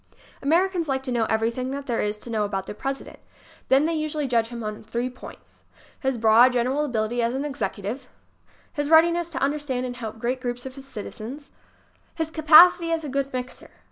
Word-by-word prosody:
Americans 340 +3 +1
like 265 -1 -1
to 260 - -4
know 235 -2 +1
everything 230 +4 -1
there 270 -3 -2
is 210 0 -2
to 230 +2 -9
know 215 -2 0
about 195 -2 -3
their - - -6
President. 270 +5 -5 0.5
Then 270 +3 +5
they 330 - 0
usually 310 -1 -2
judge 230 -3 +1
him 235 -1 -7
on 215 0 -5
three 235 +3 -3
points: 250 - -14 0.4
his 265 -2 -1
broad, 230 +3 +6
general 255 +4 +1
abil 235 -6 -1
ity 240 +3 -2
as 235 +2 0
an 275 +2 -2
executive; 240 -2 -4 0.7
his 290 0 -2
readiness 335 +1 +4
to 335 - -7
understand 275 -3 -1
and 245 -1 -5
help 225 -3 -6
great 245 +3 -2
groups 245 0 -4
of 260 - -7
citizens; 270 +1 -9 0.6
his 320 -1 -3
capacity 330 +2 +7
as 325 -1 -1
a 295 - -5
good 275 +1 -2
mixer. 255 0 -6
255 Hz, 190 wpm, -24 LUFS, 235-295 Hz, 0.7 s, capacity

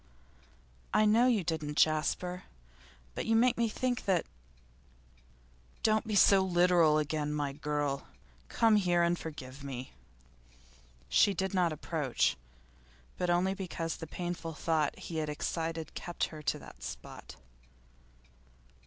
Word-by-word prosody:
'I 215 - +5
know 225 +4 +5
you 225 -7 +2
didn't, 155 -3 -3
Jasper. 180 +4 +1 0.7
But - - -4
you 225 - +3
make 240 +2 +4
me 230 -1 +1
think 250 +2 -2
that 185 -4 +2 0.8
' - - -31
'Don't 220 +1 +2
be 215 - -1
so 195 0 +6
literal 175 -4 +4
again, 150 0 -1
my 145 -2 -1
dear 140 - -14
girl. 145 -2 -2 0.4
Come 225 -2 +4
here 175 -3 +2
and 170 0 +2
forgive 140 -5 -8
me.' 130 -2 -6 1.1
She 195 - +4
did 190 +2 -2
not 180 -3 +2
approach, 150 -3 0 0.8
but 180 - 0
only 180 +2 +2
because 170 -4 -4
the 160 - -7
painful 175 -1 -5
thought 155 -1 0
he 165 - -6
had 155 -1 -1
excited 160 +2 -3
kept 175 - -4
her 155 - -8
to - - -1
that - - -13
spot. - - -8
165 Hz, 135 wpm, -31 LUFS, 150-190 Hz, 1.1 s, so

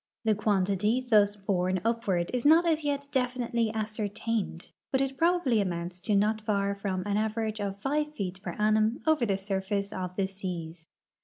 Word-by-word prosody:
The 220 -1 +3
quantity 205 +2 +1
thus 210 -5 +3
borne 185 -2 0
upward 205 -7 0
is 250 -1 -1
not 320 +4 +6
as 320 -2 +1
yet 285 -1 -1
definitely 245 -3 0
ascertained, 215 -3 -3 0.2
but 265 - +2
it 270 0 0
probably 325 -7 +2
amounts 175 -1 -3
to 210 +3 0
not 215 +2 +2
far 200 -2 0
from 195 -2 -3
an 205 0 0
average 220 0 -1
of 200 -1 -3
five 300 +5 -1
feet 185 -4 -4
per 175 - -5
annum 215 +2 +2
over 310 -7 +3
the 195 -2 +1
surface 195 +1 -2
of 180 -1 -4
the 195 - +1
seas. 175 -4 -6
210 Hz, 170 wpm, -29 LUFS, 195-235 Hz, 0.2 s, not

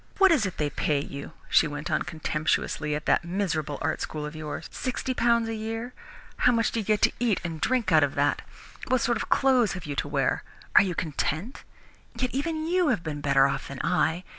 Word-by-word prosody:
What 390 -2 +6
is 255 -11 +3
it 185 - -7
they 150 -1 -1
pay 145 0 0
you," 140 0 -7
she - - +4
went 145 +1 -5
on - - +1
contemptuously, 155 -2 -1
"at 150 - -5
that - - +3
miserable 170 -5 -2
art - - -1
school 150 -1 -4
of 150 +1 -7
yours? 155 -1 -5
Sixty 255 0 -3
pounds 235 -2 +2
a 225 - -3
year! 225 +3 -4 0.4
How 250 - +4
much 230 -2 +1
do 230 - -1
you - - -2
get 210 +1 +1
to - - +5
eat 230 -5 +1
and 165 -3 -5
drink 255 -3 +1
out - - +6
of - - 0
that? - - +1 0.5
What 255 -1 +2
sort 240 -1 +1
of - - -5
clothes 255 -6 +3
have 180 -3 -7
you 145 -2 -4
to - - -1
wear? 140 -2 0 0.3
Are - - +10
you 185 -3 -1
content? 160 - -3 0.5
Yet 255 -1 -1
even 315 +3 -2
you 355 +1 +2
have 175 - +1
been 150 -2 -4
better 140 -1 +4
off 140 - -2
than 140 -1 -7
I. 180 -1 +1
185 Hz, 220 wpm, -27 LUFS, 150-240 Hz, 0.5 s, Are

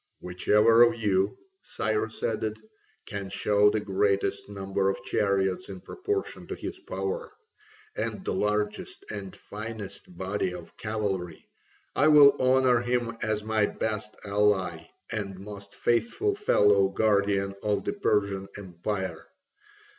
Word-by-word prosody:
"Whichever 105 +6 +4
of 120 -1 +6
you," 100 -3 +1 0.2
Cyrus 110 +1 -2
added, 110 -1 -1 0.5
"can 100 -1 -5
show 105 +1 +3
the 105 0 0
greatest 100 0 0
number 95 -1 -1
of 95 0 -3
chariots 95 -2 0
in 95 -1 -7
proportion 400 - -4
to - - -4
his - - -6
power, 485 0 -4 0.6
and 195 - -3
the - - -1
largest 105 0 -1
and 100 -3 -6
finest 105 -4 -8
body 95 -1 -2
of 85 -2 -11
cavalry, 100 -6 -3 0.5
I 145 - +4
will 145 -2 +8
honour 130 -1 +4
him 120 -1 -1
as 110 -1 -1
my 110 -1 +2
best 110 -1 -3
ally 100 -5 +1 0.2
and 100 -4 -3
most 100 0 -10
faithful 120 - +1
fellow 105 - +4
guardian 100 -1 +1
of 105 -1 0
the - - -2
Persian 100 - 0
empire. 95 0 -4
105 Hz, 125 wpm, -27 LUFS, 95-110 Hz, 0.6 s, will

